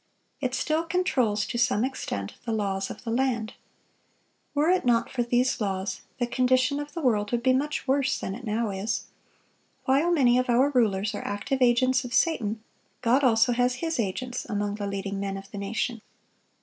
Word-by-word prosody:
It 260 -2 -1
still 310 +3 +1
controls, 275 - +1
to 235 - -3
some 230 -1 +2
extent, 100 - -4
the 235 - -3
laws 195 -3 -1
of - - -9
the 230 - -3
land. 235 -3 0 1.0
Were 300 +4 +3
it 370 - +2
not 235 -2 +2
for 250 - -1
these 245 +1 +1
laws, 190 -1 -2 0.2
the 245 - +1
condition 255 +3 +2
of 290 0 -6
the 335 - -4
world 210 -5 +1
would 240 -1 0
be 260 0 +4
much 290 +2 -1
worse 270 0 +2
than 190 - -4
it 240 +5 -8
now 220 -1 -1
is. 195 +3 -2 0.8
While 280 +6 +3
many 250 -7 +4
of 255 0 -1
our 255 +4 +4
rulers 215 -5 +1
are - - -4
active 260 +7 -2
agents 255 +1 +4
of 245 0 -4
Satan, 225 -10 +1 0.4
God 250 +5 +3
also 225 -1 +4
has 245 +1 +2
His 325 +1 -2
agents 245 +5 -2
among 205 -1 -2
the 205 -1 -4
leading 200 0 -3
men 195 0 -3
of 195 0 -11
the 205 - -6
nation. 225 +3 -2
240 Hz, 190 wpm, -26 LUFS, 210-260 Hz, 1.0 s, be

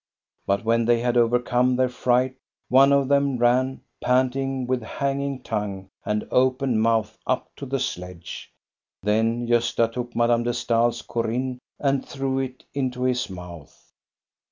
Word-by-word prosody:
But 100 +2 0
when 115 0 +2
they 120 0 +3
had 120 0 0
overcome 125 +1 +3
their 130 0 +3
fright, 125 +1 +1 0.4
one 135 +2 +6
of 140 -1 +3
them 140 -1 +2
ran, 125 +2 +2 0.2
panting, 130 +1 +1
with 125 0 0
hanging 140 +3 -2
tongue 100 -3 -4
and 105 0 -2
open 130 -2 +2
mouth 110 -1 +1
up 130 - -1
to 140 - -7
the 135 +1 -1
sledge. 90 -7 -6 0.5
Then 115 +3 +1
Gosta 115 -1 +2
took 120 0 -5
Madame 120 0 +3
de 120 0 -1
Stael's 120 0 +1
" - - -30
Corinne 125 +2 -2
" - - -54
and 140 -1 +1
threw 135 -1 -2
it 130 -1 -5
into 130 -2 -2
his 125 -3 0
mouth. 90 -4 -11
125 Hz, 155 wpm, -24 LUFS, 115-130 Hz, 0.5 s, one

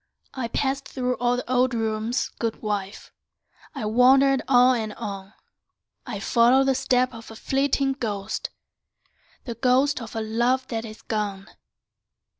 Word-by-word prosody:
I 260 -3 -3
passed 270 +3 -2
through 250 -1 -2
all 245 0 +1
the 250 - -5
old 255 0 +2
rooms, 225 +1 -1
good 230 -1 -3
wife; 205 -2 -4 0.6
I - - -4
wandered 265 +4 +4
on 250 -1 +5
and 215 -1 -4
on; 200 -2 -7 0.7
I - - -4
followed 245 +3 +4
the 270 0 +2
steps 250 0 +1
of 225 0 -11
a 225 - -10
flitting 270 +3 0
ghost, 215 -6 -4 1.0
The 235 - -4
ghost 260 +4 +2
of 225 0 -9
a 225 - -1
love 240 +4 0
that 225 -1 -3
is 215 -1 -11
gone. 205 -3 -3
240 Hz, 145 wpm, -24 LUFS, 220-260 Hz, 1.0 s, on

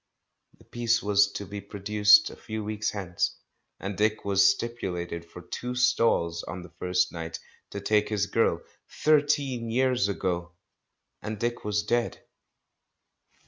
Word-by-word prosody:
The - - -20
piece 115 -1 0
was 100 0 +4
to 100 - -5
be 100 +1 -7
produced 105 +1 +4
a - - -10
few 110 0 -6
weeks 105 0 -2
hence, 95 -4 -2 0.4
and 95 +1 -4
Dick 105 +2 +2
had 100 -1 +1
stip 115 +5 +3
ulated 85 -3 -4
for 90 +1 -12
tico 125 0 -5
stalls 115 -9 +2
on 90 0 -7
the 90 - -13
first 90 0 +1
night, 80 -1 -5 0.3
to 100 - -5
take 105 +1 +1
his 105 -2 +1
girl.... - - +1 0.3
Thirteen 145 -5 +1
years 125 -2 +2
ago! 85 -3 -2 0.7
And 110 0 -5
Dick 120 0 -2
was 105 0 0
dead. 120 0 -1
105 Hz, 145 wpm, -27 LUFS, 95-115 Hz, 0.7 s, was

